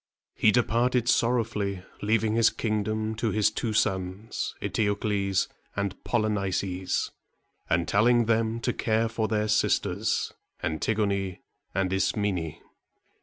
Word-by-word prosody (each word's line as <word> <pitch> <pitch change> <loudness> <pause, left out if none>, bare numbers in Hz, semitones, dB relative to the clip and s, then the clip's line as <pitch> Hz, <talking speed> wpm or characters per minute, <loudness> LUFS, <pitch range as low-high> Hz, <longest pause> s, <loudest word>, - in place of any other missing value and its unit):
He 110 - +3
departed 120 +1 +2
sorrowfully, 110 -6 +1 0.2
leaving 110 +1 +2
his 115 0 +5
kingdom 110 0 -1
to 115 0 0
his 105 0 +2
two 110 +1 -2
sons, 95 0 -1
E - - -2
te´o 105 -2 +1
cles 100 -3 +1 0.3
and 100 -1 -3
Pol 120 -3 +1
y - - +1
ni´ces, 95 -2 -1 0.6
and 85 -1 +2
telling 120 +5 +4
them 115 0 +1
to - - 0
care 110 0 +1
for 115 -1 -1
their 105 0 0
sisters, 105 0 +1 0.3
An 80 0 -2
tig´o 110 -2 +1
ne 95 -2 -2 0.3
and 95 0 +1
Is 95 -1 +2
me´ne. 95 -7 -2
105 Hz, 140 wpm, -27 LUFS, 100-115 Hz, 0.6 s, his